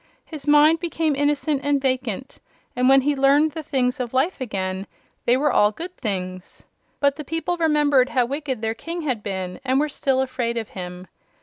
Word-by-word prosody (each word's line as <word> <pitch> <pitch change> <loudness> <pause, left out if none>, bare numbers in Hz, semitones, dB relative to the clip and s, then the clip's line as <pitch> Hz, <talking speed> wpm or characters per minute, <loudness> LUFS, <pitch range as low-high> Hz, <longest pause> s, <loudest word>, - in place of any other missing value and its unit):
His 305 -3 -9
mind 300 +2 +6
became 325 -3 -1
innocent 290 0 0
and 285 -1 +2
vacant, 260 -2 -2 0.4
and 250 +1 +3
when 270 0 +6
he 290 +2 +1
learned 280 +3 +4
the 320 - -5
things 260 -3 -1
of 250 0 -4
life 275 +5 +1
again 190 -4 -3 0.4
they 245 +2 +5
were 295 +2 +2
all 210 0 +4
good 350 - -8
things. 185 -5 -5 0.4
But 280 -1 +2
the 300 - -5
people 325 +4 -2
remembered 295 -5 +3
how 250 -2 +2
wicked 270 -3 -4
their 220 0 0
King 335 +8 -6
had 260 -8 -2
been, 190 -2 -4
and 265 0 +2
were 300 +1 +1
still 270 -2 0
afraid 250 -3 -2
of 225 -2 -4
him. 180 -1 -7
270 Hz, 190 wpm, -23 LUFS, 235-295 Hz, 0.4 s, mind